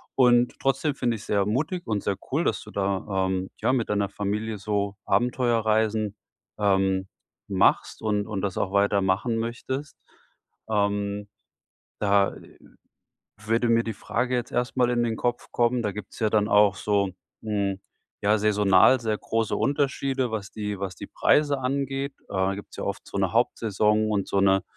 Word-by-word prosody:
Und 125 -2 +4
trotzdem 135 +2 0
finde 120 -3 0
ich 105 - -8
es - - -12
sehr 100 -2 +2
mutig 150 - -1
und 105 -3 -2
sehr 100 - 0 0.2
cool, 155 +5 +1
dass - - 0
du 105 - -12
da, 95 -1 -1
ähm, 95 0 -2
ja, - - +2
mit 125 -4 0
deiner 100 -1 0
Familie 105 +2 -3
so 100 -1 -2
Abenteuerreisen, 110 -3 +1 0.4
ähm, 95 -1 +2 0.4
machst 95 -2 +2
und 105 -2 0
und 100 -3 -3
das 100 -3 -2
auch 95 - -1
weiter 100 0 +3
machen 95 +5 0
möchtest. 130 +5 -4 0.7
Ähm, 100 -1 -1 0.7
da, 100 -1 +3
äh, - - -15 0.9
würde 115 +2 +1
mir 115 0 +4
die 115 - -4
Frage 125 +4 -2
jetzt 120 - -3
erstmal 125 0 +1
in 120 -1 +1
den 115 -1 -1
Kopf 120 0 -2
kommen 120 0 +2
Da 105 - 0
gibt 105 -2 -8
es - - -11
ja 110 -1 +2
dann 105 -1 +2
auch 105 -1 +5
so, 100 0 +1 0.3
hm, 100 -3 -1 0.4
ja 105 +2 +3
saisonal 105 +3 +5
sehr 110 -2 -1
große 115 0 -1
Unterschiede, 135 -3 0
was 105 -3 -4
die 105 -2 -4
was 95 -2 -4
die - - -8
Preise 145 -2 +2
angeht. 135 +1 -2
Äh, - - -32
da 95 +1 +1
gibt 100 - -9
es - - -12
ja - - -4
oft 100 - -4
so - - -5
'ne 95 -2 +1
Hauptsaison 110 -2 +2
und 100 -2 0
so 100 - +1
'ne 95 0 +4
105 Hz, 175 wpm, -25 LUFS, 100-120 Hz, 0.9 s, auch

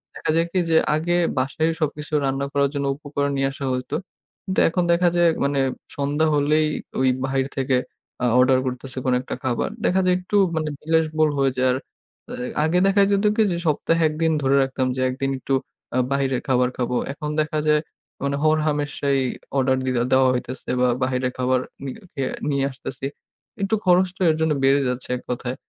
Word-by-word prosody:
দেখা - - -4
যায় 165 +1 +3
কি 185 - +1
যে 160 - +4 0.2
আগে 170 +3 0 0.2
বাসায় 140 +5 0
সবকিছু 150 0 -3
রান্না 135 +1 -1
করার 140 -1 +2
জন্য 140 -1 -2
উপকরণ 145 -1 -2
নিয়ে 135 - +2
আসা 135 0 -6
হইত। 125 0 -4 0.5
কিন্তু 190 -1 -1
এখন 180 +2 0
দেখা 175 +1 +4
যায় 175 -1 +5 0.2
মানে 140 0 +1 0.4
সন্ধ্যা 145 +3 +1
হলেই 150 +2 +3 0.3
ঐ - - -1 0.3
বাহির 135 0 0
থেকে 135 -1 +2 0.5
আ - - +3
অর্ডার 130 0 +5
করতেছে 130 +1 -5
কোন 130 - +2
একটা - - -5
খাবার। 125 -3 0 0.2
দেখা 190 +1 +3
যায় 180 - +4
একটু 185 +3 -4 0.2
মানে 155 -1 -1
বিলাস 160 +1 +2
বহুল 155 -1 +4
হয়ে 135 -1 +3
যায়। 130 - +3
আর 125 - 0 0.9
আগে 165 +3 +2
দেখা 200 +1 +4
যেত 200 +1 +2
কি 225 - +3
যে 170 - -1
সপ্তাহে 165 +2 +1
১ 155 - -3
দিন 160 - +3
ধরে 135 0 +2
রাখতাম 130 -1 -1
যে 130 - -2
১ - - -2
দিন 135 0 +1
একটু 135 - -2 0.4
আ - - +2
বাহিরের 135 -2 0
খাবার 125 -1 +3
খাবো। 125 0 -1 0.2
এখন 150 +1 -5
দেখা 155 0 -1
যায় 150 0 +4 0.4
মানে 140 0 0
হরহামেশাই 150 -3 +1 0.4
অর্ডার 130 0 +2
দি - - 0 0.2
দেওয়া 130 0 +5
হইতেছে 125 +1 -5
বা 125 - +4 0.2
বাহিরের 130 0 0
খাবার 130 0 +2 0.2
নি 140 - -4 0.3
এ - - +1 0.3
নিয়ে 140 -1 +1
আসতেছি। 130 0 -7 0.6
একটু 195 +3 +1
খরচটা 185 +1 +3
এর - - -1
জন্য 160 -1 +2
বেড়ে 135 +1 +4
যাচ্ছে 125 0 -4
এক - - -10
কথায়। 125 +1 -3
140 Hz, 190 wpm, -23 LUFS, 130-155 Hz, 0.9 s, যায়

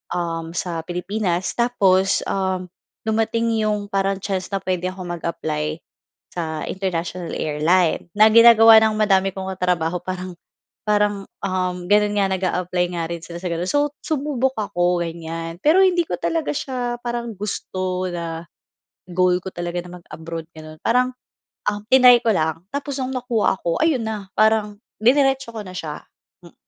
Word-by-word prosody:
um, 165 -1 -3
sa 175 -2 -2
Pilipinas. 180 0 -2
Tapos, 195 -6 +3
um, 190 -2 -2 0.3
dumating 225 +1 0
'yong 210 -1 -1
parang 195 0 +1
chance 190 -2 -2
na 195 -1 -3
puwede 185 -1 -1
ako 185 0 -6 0.2
mag-apply 155 -2 -3 0.6
sa 160 -3 -3
International 180 -2 -3
Airline, 160 +4 +1
na 215 +1 +7
ginagawa 225 -1 +9
ng 220 0 +2
madami 195 -2 +3
kong 190 0 -4
katrabaho 180 -1 0
parang 185 -1 -5 0.5
parang, 210 -2 +1 0.2
um, 180 -2 -2
gano'n 210 0 +4
nga 195 - +3
nag-aapply 180 -1 0
nga 170 - -2
rin 170 -1 -6
sila 170 0 -8
sa 180 - -4
gano'n. 170 +2 -2
So, 290 0 +1
sumubok 280 -4 0
ako 175 -3 +1
ganyan, 165 0 -5
pero 320 +5 +5
hindi 355 -2 +4
ko 175 - -3
talaga 165 -3 -1
siya 245 - -3
parang 240 -1 -3
gusto 185 -2 -3
na 165 -1 -5 0.7
goal 180 0 +2
ko 190 - -6
talaga 175 0 -4
na 180 0 -10
mag-abroad, 165 0 -8
gano'n. 155 0 -11
Parang, 250 +2 +2 0.5
ah, 205 0 -1
triny 250 -2 +7
ko 230 - +2
lang. 160 +1 -1
Tapos 280 -1 -4
nung 255 - -3
nakuha 240 -6 0
ako, 170 -2 -1
ayun 310 -7 +2
na 210 -3 -5
parang 215 -1 +2 0.2
diniretso 270 +1 +3
ko 215 - -4
na 185 - -9
siya, 155 -4 -6 0.4
hmm. 170 - -17
185 Hz, 155 wpm, -21 LUFS, 175-220 Hz, 0.7 s, ginagawa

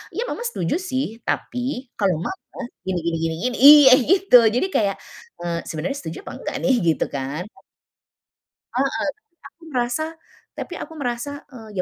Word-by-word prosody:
"Iya, 460 - -1
Mama - - -4
setuju 180 - -1
sih, 275 -8 -2 0.2
tapi 250 0 -3
kalau 190 -5 +2
Mama 380 - -8 0.3
gini 185 -2 0
gini 170 -1 0
gini 165 0 -1 0.2
gini" - - -5
iya, 290 -2 +10 0.2
gitu, 385 -8 +6 0.2
jadi 250 - +2
kayak, 200 -2 +2 0.5
eee, 170 -1 -2
"Sebenarnya 165 - -3
setuju 160 -1 -7
apa - - -8
enggak - - -5
nih?" 260 - +4
gitu 160 - +2
kan. 140 +4 -4 1.3
Heeh, 270 +2 +2 0.5
tapi 335 - -15
merasa, 250 0 -1 0.5
tapi - - -6
aku 320 - -7
merasa, 285 +1 -4
eee, 220 -5 -12
245 Hz, 150 wpm, -22 LUFS, 175-285 Hz, 1.3 s, iya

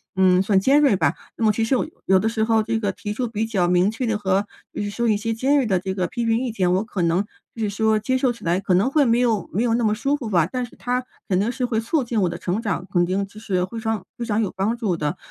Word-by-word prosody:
嗯， 185 -1 +4
算 195 0 +3
尖 275 +9 +4
锐 270 -8 +4
吧。 160 -5 +2 0.2
那 225 - 0
么 215 - +5
其 225 +2 -1
实 225 +4 +2
我 - - -1 0.2
有 190 0 +4
的 215 - 0
时 220 -1 0
候 220 0 +3
这 225 +1 -1
个 205 -3 0
提 205 +2 -5
出 245 +3 -2
比 220 -1 -2
较 195 -6 0
明 180 +2 +3
确 225 +4 -3
的 225 -2 0
和 195 0 0 0.3
比 - - -3
如 205 - -3
说 235 +3 -1
一 215 - +3
些 225 +2 -2
尖 265 +6 +1
锐 275 -3 +3
的 190 -5 +1
这 190 +1 -3
个 185 -2 -1
批 235 +6 -3
评 225 0 +2
意 250 -1 -2
见， 185 -5 +1
我 190 +3 +1
可 210 -4 -4
能 170 +3 +2 0.3
就 230 - -6
是 210 - 0
说 220 +1 +2
接 260 +5 0
受 255 -1 +2
起 235 - -15
来 175 +2 +1
可 195 -1 0
能 195 +8 +3
会 290 -1 +4
没 235 0 +3
有 225 -7 +1
没 210 +7 +1
有 235 -2 +1
那 240 - 0
么 215 -1 +2
舒 275 +7 0
服 255 -7 -5
吧， 170 -6 +3
但 250 +8 -3
是 240 - -16
它 250 +1 -2 0.3
肯 185 -2 +2
定 215 +4 +1
是 255 0 -2
会 230 -3 0
促 265 +6 0
进 230 -3 -1
我 180 - +2
的 - - -5
成 190 +5 -2
长， 190 -6 -2
肯 175 -1 +3
定 190 +3 -1
其 210 +2 -13
实 185 -5 -1
非 225 +5 -7
常 220 -3 -2
非 235 - -3
常 220 -1 0
有 205 - -1
帮 200 +5 0
助 210 -7 0
的。 150 -2 -2
215 Hz, 335 characters per minute, -22 LUFS, 190-235 Hz, 0.3 s, 么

